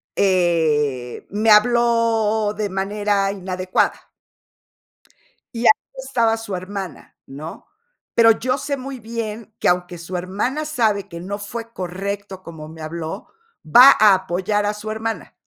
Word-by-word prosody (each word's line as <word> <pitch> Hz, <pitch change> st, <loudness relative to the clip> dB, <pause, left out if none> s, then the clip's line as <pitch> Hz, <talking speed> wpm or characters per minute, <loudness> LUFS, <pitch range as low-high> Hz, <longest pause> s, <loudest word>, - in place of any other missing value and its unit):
eh, 155 Hz, -9 st, +1 dB
me 215 Hz, +3 st, 0 dB
habló 225 Hz, -1 st, +3 dB
de 210 Hz, -1 st, -1 dB
manera 200 Hz, +1 st, 0 dB
inadecuada 185 Hz, -1 st, -2 dB, 1.5 s
y 230 Hz, -, -3 dB
ahí 215 Hz, -, +3 dB
estaba 240 Hz, -4 st, +1 dB
su 225 Hz, -4 st, -5 dB
hermana, 185 Hz, -2 st, -7 dB
¿no? 150 Hz, +4 st, -9 dB, 0.5 s
Pero 230 Hz, -1 st, +7 dB
yo 255 Hz, +4 st, -1 dB
sé 285 Hz, -1 st, -3 dB
muy 265 Hz, 0 st, -7 dB
bien 225 Hz, -1 st, -6 dB
que, -, -, +2 dB
aunque 180 Hz, 0 st, 0 dB
su 175 Hz, +2 st, -6 dB
hermana 205 Hz, +12 st, -2 dB
sabe 220 Hz, -9 st, 0 dB
que 170 Hz, -2 st, -8 dB
no 200 Hz, +3 st, -5 dB
fue 230 Hz, +3 st, -7 dB
correcto 195 Hz, +1 st, -5 dB
cómo 160 Hz, -3 st, -10 dB
me 160 Hz, 0 st, -11 dB
habló, 165 Hz, +4 st, -6 dB, 0.4 s
va 250 Hz, -, +8 dB
a 210 Hz, -2 st, +8 dB
apoyar 190 Hz, +3 st, -1 dB
a 210 Hz, -, 0 dB
su 215 Hz, +1 st, -7 dB
hermana. 225 Hz, +1 st, -4 dB
205 Hz, 135 wpm, -21 LUFS, 180-225 Hz, 1.5 s, va